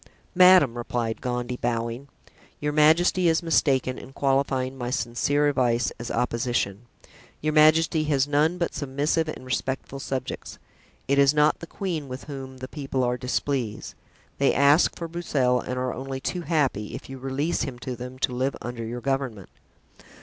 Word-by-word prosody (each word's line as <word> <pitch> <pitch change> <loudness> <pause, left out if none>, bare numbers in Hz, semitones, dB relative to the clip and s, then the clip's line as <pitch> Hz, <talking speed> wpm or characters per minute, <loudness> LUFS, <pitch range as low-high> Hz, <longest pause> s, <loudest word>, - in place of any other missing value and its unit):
"Madame," 180 -9 +6
replied 120 -1 -3
Gondy, 125 0 -3
bowing, 120 +2 -2 0.5
"your 150 0 -1
majesty 165 +4 +4
is 160 +1 +1
mistaken 135 -6 +1
in 135 - -12
qualifying 135 -1 0
my 125 -2 -4
sincere 130 +4 +1
advice 125 -4 +1
as 120 +1 -5
opposition. 120 -3 -1 0.5
Your 155 0 -1
majesty 155 +1 +4
has 140 -2 +2
none 150 +4 +2
but 170 - -1
submissive 145 +4 -1
and 155 - -6
respectful 130 +1 -3
subjects. 135 -1 -5 0.5
It 140 +1 +3
is 140 +1 +5
not 150 0 +3
the 165 - -8
queen 165 -7 -4
with 130 0 -7
whom 135 -2 -8
the 130 0 -7
people 135 -3 -3
are 125 0 +1
displeased; 125 -2 -2 0.5
they 140 - +3
ask 140 +4 +4
for 170 - -5
Broussel 145 -7 +1
and 125 - -4
are 125 0 -1
only 135 0 -5
too 135 +6 -3
happy, 140 - 0
if - - -9
you 135 0 -8
release 135 +5 -1
him 130 -3 -3
to 130 -2 -4
them, 125 +1 -8
to 125 - +1
live 130 +2 -1
under 120 -1 -6
your 120 +2 -5
government." 130 - -2
135 Hz, 165 wpm, -25 LUFS, 125-150 Hz, 0.5 s, Madame